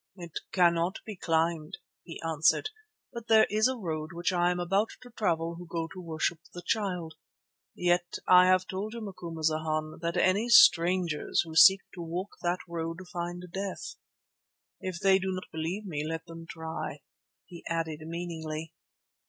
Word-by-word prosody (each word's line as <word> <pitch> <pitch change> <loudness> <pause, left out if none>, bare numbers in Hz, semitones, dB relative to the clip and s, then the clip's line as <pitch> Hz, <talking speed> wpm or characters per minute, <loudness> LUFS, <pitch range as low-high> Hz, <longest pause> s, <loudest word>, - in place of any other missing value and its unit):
"It 170 -4 -7
cannot 175 0 +3
be 215 - -6
climbed," 165 -1 0 0.2
he 165 - -9
answered, 160 - +2 0.4
"but 235 -1 -7
there 220 -1 +6
is 215 +2 +4
a 260 0 -2
road 160 -6 -4
which 175 +2 -1
I 175 0 +3
am 180 0 -1
about 195 +5 +1
to 245 - -13
travel 170 -6 -1
who 175 - -9
go 165 0 -3
to 185 - -8
worship 165 0 -2 0.2
the 175 - -7
Child. 180 -7 -1 0.6
Yet 175 0 +1
I 180 0 +8
have 185 0 +4
told 200 +4 -4
you, 235 - -6
Macumazana, 160 -5 -2
that 170 0 -2
any 200 +6 +2
strangers 175 -6 +5
who 160 -1 -9
seek 195 +4 +8
to 180 - -7
walk 175 +4 -4
that 175 +1 0
road 165 -1 -4 0.2
find 175 0 -4
death. 195 0 -4 0.9
If 185 -2 -5
they 195 0 +4
do 190 0 -2
not 185 0 -5
believe 165 +6 -3
me, 150 -6 -3
let 165 +1 -4
them 165 -1 -10
try," 160 0 -5 0.4
he 175 -3 -12
added 165 -2 -2
meaningly. 160 -1 -5
175 Hz, 160 wpm, -29 LUFS, 165-185 Hz, 0.9 s, I